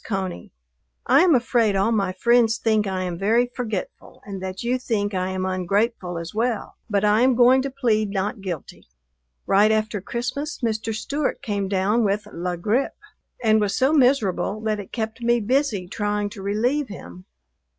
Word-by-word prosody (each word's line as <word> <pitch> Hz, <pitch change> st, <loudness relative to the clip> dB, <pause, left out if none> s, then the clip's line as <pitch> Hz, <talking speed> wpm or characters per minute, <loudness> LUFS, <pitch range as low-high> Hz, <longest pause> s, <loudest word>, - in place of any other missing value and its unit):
CONEY, 190 Hz, -, -4 dB, 0.6 s
I -, -, +5 dB
am 350 Hz, -4 st, +5 dB
afraid 235 Hz, -4 st, +2 dB
all 195 Hz, +4 st, +2 dB
my 200 Hz, -4 st, +1 dB
friends 230 Hz, +3 st, +3 dB
think 215 Hz, -2 st, +1 dB
I 190 Hz, -1 st, -2 dB
am 175 Hz, -2 st, -4 dB
very 235 Hz, +5 st, +2 dB
forgetful 220 Hz, -7 st, -5 dB
and 195 Hz, -2 st, -7 dB
that 190 Hz, +2 st, -5 dB
you 250 Hz, +2 st, 0 dB
think 210 Hz, -5 st, -1 dB
I 185 Hz, 0 st, -1 dB
am 185 Hz, 0 st, -2 dB
ungrateful 185 Hz, 0 st, -1 dB
as 170 Hz, +1 st, -6 dB
well, 230 Hz, 0 st, -2 dB
but 205 Hz, -1 st, +1 dB
I 210 Hz, +2 st, +4 dB
am 255 Hz, 0 st, +4 dB
going 250 Hz, +2 st, +5 dB
to 275 Hz, -, -3 dB
plead 230 Hz, -6 st, 0 dB
not 200 Hz, +2 st, -2 dB
guilty. 175 Hz, -7 st, -7 dB, 0.6 s
Right 205 Hz, +2 st, +4 dB
after 215 Hz, -2 st, 0 dB
Christmas 255 Hz, -, -4 dB
Mr. 225 Hz, -1 st, -1 dB
Stewart 280 Hz, +6 st, -2 dB
came 205 Hz, -2 st, -2 dB
down 200 Hz, +4 st, +1 dB
with 205 Hz, 0 st, 0 dB
la 175 Hz, +1 st, -3 dB
grippe 215 Hz, +10 st, -1 dB, 0.5 s
and 220 Hz, -1 st, +4 dB
was 200 Hz, -1 st, 0 dB
so 265 Hz, +4 st, +3 dB
miserable 245 Hz, -, +2 dB
that 215 Hz, -1 st, -1 dB
it 195 Hz, -, -9 dB
kept 225 Hz, 0 st, -4 dB
me 235 Hz, 0 st, +2 dB
busy 230 Hz, -4 st, 0 dB
trying 205 Hz, +1 st, -2 dB
to 210 Hz, -2 st, -9 dB
relieve 240 Hz, +9 st, 0 dB
him. 90 Hz, -, -10 dB
215 Hz, 175 wpm, -23 LUFS, 195-240 Hz, 0.6 s, I